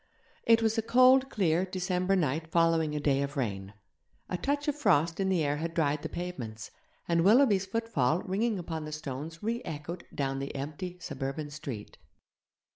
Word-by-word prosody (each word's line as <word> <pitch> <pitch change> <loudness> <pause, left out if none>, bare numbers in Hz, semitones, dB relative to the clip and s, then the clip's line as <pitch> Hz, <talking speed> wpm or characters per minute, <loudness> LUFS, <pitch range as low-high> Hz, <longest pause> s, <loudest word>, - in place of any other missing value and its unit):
It 230 0 +5
was 225 +1 +2
a - - +2
cold, 255 +3 +5
clear 180 -6 +1
December 185 0 0
night 160 -2 0
following 165 -2 +2
a - - 0
day 140 -2 +2
of 140 +1 -3
rain. 100 -5 -3 0.5
A - - -1
touch 285 - -1
of 295 - +1
frost 165 - +2
in 190 -1 +1
the 180 -4 +2
air 145 0 0
had 165 +2 -4
dried 150 -2 +1
the - - -5
pavements, 120 -12 -6 0.4
and 170 -1 +2
Willoughby's 205 -2 +5
footfall 185 - 0
ringing 210 +3 0
upon 160 -3 -5
the 155 - -6
stones 155 +3 -6
re 230 +3 -1
echoed 160 +4 -6
down 135 -1 -1
the 140 +1 -5
empty 155 +6 -5
suburban 145 -2 -5
street. 135 -8 -7
165 Hz, 175 wpm, -30 LUFS, 145-195 Hz, 0.5 s, It